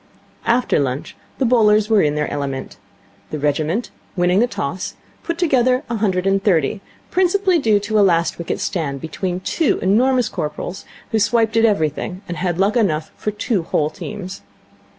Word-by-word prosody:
After 240 -5 +2
lunch 135 -1 -3 0.2
the 265 - +1
bowlers 215 -3 +4
were 215 -2 +4
in 150 -1 +1
their 150 0 0
element. 140 -2 -4 0.5
The 155 - -4
regiment, 155 - -1 0.2
winning 180 +1 +3
the 240 - +4
toss, 180 - -4 0.3
put 335 -1 -3
together 255 -6 +2
a 230 - 0
hundred 190 -4 0
and 195 0 +2
thirty, 170 -6 +2
due 215 - -10 0.3
principally 370 0 +2
to 215 -2 +2
a - - +6
last 170 -4 +2
wicket 170 - -3
stand 140 -6 -2
between 180 +4 -4
two 315 - +1
enormous 245 +5 +3
corporals, 150 +4 -5 0.3
who 220 - +2
swiped 225 +1 +2
at 225 0 +5
everything 180 -1 -1
and 175 - -5
had 175 0 -1
luck 195 +4 +2
enough 160 -10 +1
for - - -3
two 210 -1 -1
whole 155 -2 0
teams. 195 0 -7
195 Hz, 170 wpm, -20 LUFS, 165-230 Hz, 0.5 s, a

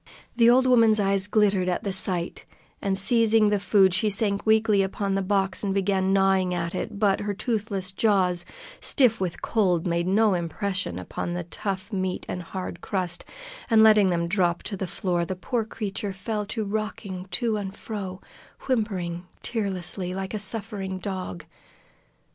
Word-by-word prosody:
The 235 -1 +6
old 255 +2 +5
woman's 230 -4 +5
eyes 195 -1 +1
glittered 205 -3 +2
at 180 - -1
the 200 - -2
sight, 180 -2 -2 0.4
and, 195 -1 0
seizing 225 +1 +4
the 205 -1 +1
food, 190 -1 +4
she 215 +3 +2
sank 200 0 0
weakly 220 -2 +4
upon 195 +1 -1
the 195 - +1
box 195 0 0
and 195 -1 -1
began 190 -1 +1
gnawing 190 -2 +3
at 170 -1 -3
it; - - -4
but 200 -2 +2
her 205 0 -3
toothless 205 -4 -2
jaws, 185 -4 +2 0.4
stiff 240 -7 +4
with 180 -3 -3
cold, 185 -7 +1
made 170 0 0
no 210 +2 +3
impression 180 - -2
upon 175 - -4
the 175 - -3
tough 195 +4 -5
meat 185 -1 -2
and 180 - -4
hard 180 0 -6
crust, 180 -3 -2 0.4
and 220 -1 +6
letting 215 -3 +6
them 170 -1 0
drop 175 -2 +1
to 205 - -3
the 190 -1 -4
floor, 175 -1 -1
the 185 +2 -3
poor 230 +5 -2
creature 210 -2 -4
fell 210 +2 -3
to 220 +1 -3
rocking 205 -2 -4
to 220 +4 0
and 195 -1 -5
fro, 195 -5 -6 0.4
whimpering 185 -8 -2 0.2
tearlessly, 185 -4 -3
like 195 +1 -4
a 215 - -2
suffering 200 -3 -4
dog. 185 - -5
195 Hz, 165 wpm, -25 LUFS, 185-215 Hz, 0.4 s, The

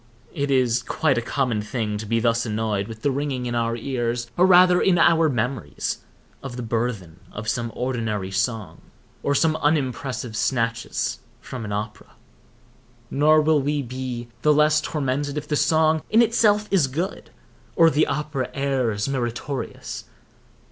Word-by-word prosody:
It 140 -3 -2
is 125 -3 +2
quite 135 +1 +1
a - - -3
common 120 -3 -1
thing 105 -2 -3
to 110 - -6
be 115 +1 +1
thus 115 0 +1
annoyed 105 -3 -1
with 110 -1 -10
the 145 - +2
ringing 135 -2 -2
in 120 - -2
our 115 -1 0
ears, 120 -1 -3
or 180 +2 +5
rather 180 -1 +6
in 185 -2 +3
our 165 -1 +4
memories, 120 - -2 0.4
of 135 -3 -7
the 125 - -4
burthen 110 -7 -3
of 105 +1 -7
some 115 0 -1
ordinary 110 -6 -2
song, 105 +2 -2 0.4
or 140 - 0
some 155 +2 +3
unimpressive 135 -6 -1
snatches 115 -1 -1 0.2
from 125 -4 -7
an 105 - -6
opera. 105 +1 -5 1.0
Nor 155 +2 +4
will 155 -1 +3
we 145 +1 -1
be 125 -1 -5
the 150 - +4
less 150 0 +4
tormented 145 -1 -2
if 150 0 -4
the 150 - 0
song 155 +1 +3
in 225 +2 +5
itself 210 -2 +3
be 195 - +2
good, 170 +8 -4 0.5
or 165 -1 +6
the 155 +1 +2
opera 150 -4 -2
air 135 -6 0
meritorious. 130 +1 -4
130 Hz, 155 wpm, -23 LUFS, 115-150 Hz, 1.0 s, rather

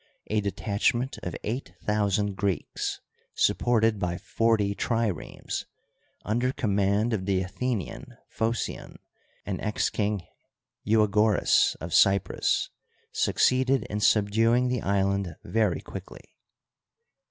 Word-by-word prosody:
A 110 0 +2
detachment 105 +6 -1
of 90 - -5
eight 120 +6 -4
thousand 105 -1 0
Greeks, 95 -4 -2 0.3
supported 115 -3 +2
by 90 -1 -1
forty 110 -2 +1
triremes, 115 -5 -2 0.6
under 120 +4 0
command 100 0 +1
of 95 -3 -2
the 95 -1 +1
Athe 95 - -11 0.2
nian 90 - -8 0.2
Phocion 115 +1 -2 0.5
and 100 -2 -3
ex 105 -1 0
King 105 -3 -1 0.6
Eua^oras 105 0 +3
of - - -6
Cyprus, 95 -1 +2 0.4
succeeded 130 -1 +2
in 105 - -1
subduing 115 +4 +3
the 125 -3 -1
island 100 -2 0
very 110 -5 0
quickly. - - -10
105 Hz, 105 wpm, -27 LUFS, 100-115 Hz, 0.6 s, Eua^oras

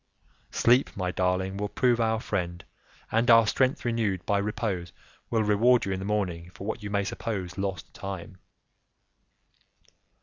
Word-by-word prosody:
"Sleep, 125 -1 +3
my 90 -2 -1
darling, 95 +1 0
will 105 0 -2
prove 120 -1 +2
our 110 -1 +1
friend, 85 -5 -3 0.5
and 115 +2 +2
our 115 -1 +8
strength 130 +5 +1
renewed 110 -6 0
by 100 0 +2
repose 100 -4 -2 0.4
will 110 -2 +2
reward 115 +4 +4
you 95 - -2
in 95 - -2
the 95 - -5
morning 90 -5 -2
for 95 - -8
what 110 +1 -3
you 105 - -5
may 100 0 +1
suppose 95 -3 -4
lost 95 -3 -4
time." 95 -1 -7
100 Hz, 155 wpm, -27 LUFS, 95-115 Hz, 0.5 s, our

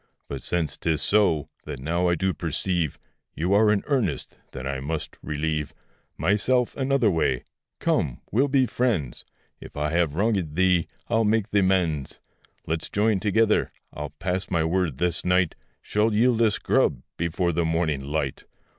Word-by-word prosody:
But 70 - -5
since 85 -3 -1
'tis 80 -3 0
so, 85 -6 +2 0.2
that 70 - -6
now 85 +6 0
I 85 - +3
do 95 +3 0
perceive 85 -1 -1 0.4
You 90 +4 0
are 105 +1 +5
in 100 -2 +1
earnest, 120 - -1 0.2
then 65 -1 -7
I 70 0 -2
must 75 +3 -4
relieve 75 0 -2 0.4
Myself 105 - +2
another 135 -5 +2
way: 65 -7 0 0.3
come, 65 -5 0
we'll 130 +7 +3
be 135 -2 +3
friends; 110 - -1 0.3
If - - -11
I 75 +1 0
have 85 -3 +1
wrongèd 95 -4 0
thee, 90 -2 +3 0.2
I'll 115 -1 +2
make 110 0 +1
th' 105 - +2
amends. 90 -7 +1 0.5
Let's 80 0 -2
join 105 -1 +2
together; 110 +2 +2 0.2
I'll 75 0 -5
pass 90 +2 -2
my 85 -3 +1
word 80 -4 0
this 85 +1 0
night 90 -2 +2 0.3
Shall 105 +1 +1
yield 115 +1 +3
us 110 -4 +3
grub, - - +1
before 85 +1 0
the 85 +1 0
morning 80 -4 0
light. 70 -1 -3
90 Hz, 160 wpm, -25 LUFS, 80-105 Hz, 0.5 s, are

